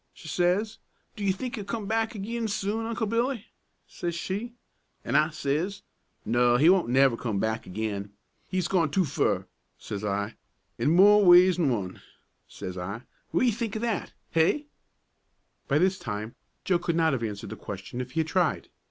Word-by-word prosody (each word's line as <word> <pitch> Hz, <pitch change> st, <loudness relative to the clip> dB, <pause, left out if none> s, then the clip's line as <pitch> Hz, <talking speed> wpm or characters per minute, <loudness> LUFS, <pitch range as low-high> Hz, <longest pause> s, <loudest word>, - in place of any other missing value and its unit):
she -, -, -12 dB
says. 185 Hz, +6 st, +1 dB, 0.4 s
'Do 210 Hz, -, -6 dB
you 195 Hz, -, +3 dB
think 240 Hz, +6 st, -4 dB
he'll 210 Hz, -, -4 dB
come 205 Hz, +1 st, -4 dB
back 225 Hz, +2 st, 0 dB
agin 225 Hz, +3 st, -3 dB
soon, 210 Hz, +2 st, -2 dB
Uncle 230 Hz, 0 st, -1 dB
Billy?' 230 Hz, +1 st, -1 dB, 0.4 s
says 170 Hz, -1 st, -4 dB
she. 205 Hz, +7 st, -4 dB, 0.5 s
An' -, -, -1 dB
I 155 Hz, -, +4 dB
says, 155 Hz, +6 st, -2 dB, 0.4 s
'No, 120 Hz, +1 st, +3 dB
he 155 Hz, +6 st, +6 dB
won't 185 Hz, -9 st, +2 dB
never 130 Hz, -1 st, +4 dB
come 115 Hz, -3 st, -3 dB
back 110 Hz, +2 st, -1 dB
agin. 100 Hz, 0 st, -4 dB, 0.4 s
He's 185 Hz, -2 st, -1 dB
gone 170 Hz, -5 st, +2 dB
too 180 Hz, +5 st, +2 dB
fur,' 145 Hz, -, 0 dB, 0.3 s
says 100 Hz, 0 st, -6 dB
I, 100 Hz, +1 st, -2 dB, 0.4 s
'in -, -, +2 dB
more 205 Hz, +5 st, +7 dB
ways 180 Hz, 0 st, +7 dB
'an 155 Hz, -5 st, +3 dB
one,' 100 Hz, -7 st, -3 dB, 0.5 s
says 90 Hz, 0 st, -7 dB
I. 100 Hz, +7 st, -5 dB, 0.3 s
What -, -, +2 dB
ye 240 Hz, -, +4 dB
think 225 Hz, -1 st, -3 dB
o' -, -, -1 dB
that? 230 Hz, -5 st, -2 dB, 0.2 s
Hey?" 165 Hz, -, +2 dB, 1.0 s
But 150 Hz, +3 st, +2 dB
this 185 Hz, 0 st, +2 dB
time 105 Hz, +1 st, -5 dB, 0.3 s
Joe 180 Hz, -2 st, +2 dB
could 170 Hz, -1 st, -1 dB
not 160 Hz, -2 st, +3 dB
have 130 Hz, -, -1 dB
answered 105 Hz, -3 st, -5 dB
the -, -, -5 dB
question 100 Hz, +5 st, -6 dB
if 125 Hz, 0 st, -7 dB
he 165 Hz, -, +2 dB
had 160 Hz, -, -3 dB
tried. 175 Hz, -1 st, 0 dB
170 Hz, 180 wpm, -27 LUFS, -, 1.0 s, more